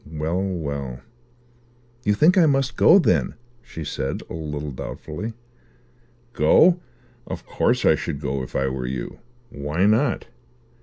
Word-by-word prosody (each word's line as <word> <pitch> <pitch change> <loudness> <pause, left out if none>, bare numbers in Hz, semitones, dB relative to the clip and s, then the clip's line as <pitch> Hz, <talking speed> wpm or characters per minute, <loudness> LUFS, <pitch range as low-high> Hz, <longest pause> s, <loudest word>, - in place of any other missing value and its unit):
Well, 80 +4 -2
well." 70 -9 -4 1.0
"You 105 -1 +2
think 160 - +5
I 175 -4 +5
must 135 -2 +1
go, 185 - +7
then," 190 - +2 0.3
she 80 -8 -8
said 70 -2 -3
a - - -4
little 75 -2 -5
doubtfully. 80 - -6 1.0
"Go? 170 - +5 0.5
Of - - -6
course - - +1
I - - +6
should 70 - -3
go, 70 -2 -2
if 65 - -8
I 65 - +1
were 65 -1 -3
you. 65 -1 -5 0.3
Why 75 +6 -1
not?" 115 +5 +2
80 Hz, 140 wpm, -23 LUFS, 70-110 Hz, 1.0 s, go